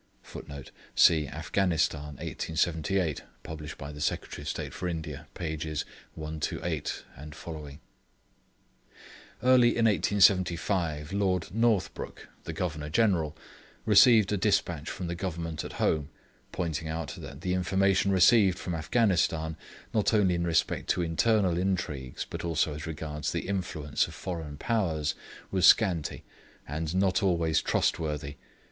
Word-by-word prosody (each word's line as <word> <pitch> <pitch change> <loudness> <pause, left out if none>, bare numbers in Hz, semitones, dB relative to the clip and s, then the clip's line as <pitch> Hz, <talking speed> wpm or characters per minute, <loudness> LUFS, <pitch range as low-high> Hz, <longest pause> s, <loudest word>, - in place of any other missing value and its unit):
[Footnote: 70 -2 -9 0.2
See 80 -3 +5
Afghanistan, 80 -2 -1
1878, 80 +1 -1 0.2
published 75 -1 -7
by 75 +1 -8
Secretary 75 - -2
of 75 - -5
State - - -4
for 90 - -4
India, 80 -4 -5
p. 80 -3 -3 0.6
128 80 -1 -3
et 75 +2 -10
seq.] 75 -3 -8 1.6
Early 125 -1 +6
in 115 - +3
1875, 90 -5 +2
Lord 95 -4 0
Northbrook, 115 -3 -1 0.2
the - - -4
Governor 80 -3 -3
General, 85 -5 +1 0.5
received 110 0 +6
a 105 - +1
despatch 90 -6 0
from 90 - -5
the 85 - -2
Government 85 -3 -4
at - - -7
home, 75 -2 0 0.4
pointing 80 -3 -3
out 80 -1 -4
that - - -9
the 90 - -1
information 95 +2 +2
received 95 0 +5
from 90 - -4
Afghanistan, 80 -3 +1 0.4
not 110 0 +2
only 95 -4 +3
in 85 0 -1
respect 80 -2 0
to 90 - +2
internal 90 +1 +2
intrigues 90 -9 -2
but - - -6
also 80 -2 0
as 75 +2 -6
regards 75 -2 -4
the - - -3
influence 85 -7 -1
of - - -11
foreign 80 -6 -5
Powers, 80 -9 0 0.4
was 95 -2 +4
scanty, 90 -8 +3 0.4
and 80 +3 -3
not 95 -1 +2
always 85 -5 +2
trustworthy. 75 -3 -1
85 Hz, 125 wpm, -29 LUFS, 75-95 Hz, 1.6 s, Early